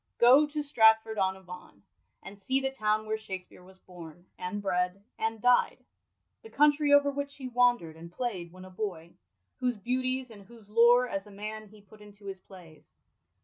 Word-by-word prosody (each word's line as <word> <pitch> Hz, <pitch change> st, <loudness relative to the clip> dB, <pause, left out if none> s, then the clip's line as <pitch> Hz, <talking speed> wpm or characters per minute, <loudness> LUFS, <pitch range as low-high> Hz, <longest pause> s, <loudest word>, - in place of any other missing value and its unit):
Go 260 Hz, +5 st, +6 dB
to 300 Hz, 0 st, -4 dB
Stratford 220 Hz, -5 st, +3 dB
on 190 Hz, 0 st, 0 dB
Avon, 180 Hz, -, -13 dB, 0.4 s
and 200 Hz, +1 st, -11 dB
see 260 Hz, +7 st, 0 dB
the 270 Hz, 0 st, -2 dB
town 215 Hz, -4 st, -1 dB
where 220 Hz, 0 st, -3 dB
Shakspere 190 Hz, -3 st, -9 dB
was 190 Hz, +1 st, -18 dB
bom, 175 Hz, -2 st, -13 dB
and 180 Hz, +3 st, -5 dB
bred, 185 Hz, 0 st, -2 dB, 0.2 s
and 225 Hz, 0 st, -2 dB
died; 245 Hz, +2 st, +2 dB, 0.6 s
the 450 Hz, -, -13 dB
country 295 Hz, -1 st, +3 dB
over 285 Hz, 0 st, +5 dB
which 280 Hz, 0 st, -5 dB
he 265 Hz, -2 st, -7 dB
wandei 245 Hz, -9 st, +2 dB
d 160 Hz, -, -17 dB
and 170 Hz, +1 st, -11 dB
playd 185 Hz, -5 st, -4 dB
when 185 Hz, +1 st, -12 dB
a 185 Hz, -, -13 dB
boy, 180 Hz, -4 st, -6 dB, 0.5 s
whose 250 Hz, -3 st, -1 dB
beauties 255 Hz, +3 st, -2 dB
and 200 Hz, -3 st, -13 dB
whose 225 Hz, -3 st, -17 dB
lore, 240 Hz, +2 st, +5 dB
as 195 Hz, -3 st, -5 dB
a -, -, -14 dB
man, 215 Hz, +2 st, -7 dB
he 210 Hz, 0 st, -18 dB
put 210 Hz, +2 st, -19 dB
into 205 Hz, 0 st, -16 dB
his 195 Hz, -1 st, -7 dB
plays. 165 Hz, -6 st, -17 dB
215 Hz, 190 wpm, -29 LUFS, 185-245 Hz, 0.6 s, Go